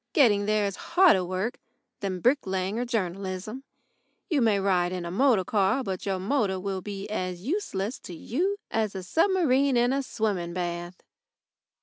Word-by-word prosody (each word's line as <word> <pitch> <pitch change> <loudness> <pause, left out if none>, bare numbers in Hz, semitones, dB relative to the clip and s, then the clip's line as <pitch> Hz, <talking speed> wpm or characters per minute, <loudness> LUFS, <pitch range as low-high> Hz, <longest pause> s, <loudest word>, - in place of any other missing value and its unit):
Getting 210 - +4
there 215 -1 +2
is 200 -1 -3 0.2
harder 345 - +7
work 185 +6 -3 0.4
than 185 -3 -3
bricklaying 200 -6 +1
or 245 - -1
journalism. 195 +1 -3 0.7
You 295 -5 +3
may 215 -4 +3
ride 180 -2 +2
in 180 -2 -4
a 170 - -4
motor 230 -1 +3
car, 205 +7 +1
but 190 -3 -4
your 195 -1 0
motor 195 -1 0
will 190 0 -3
be 200 0 -6
as 185 -4 -3
useless 245 - -2
to 175 - -9
you 360 - -1
as 215 -3 0
a 190 - -4
submarine 280 - +2
in 245 +2 +3
a 275 - +1
swimming 200 -9 -2
bath. 175 0 -4
200 Hz, 160 wpm, -27 LUFS, 185-250 Hz, 0.7 s, harder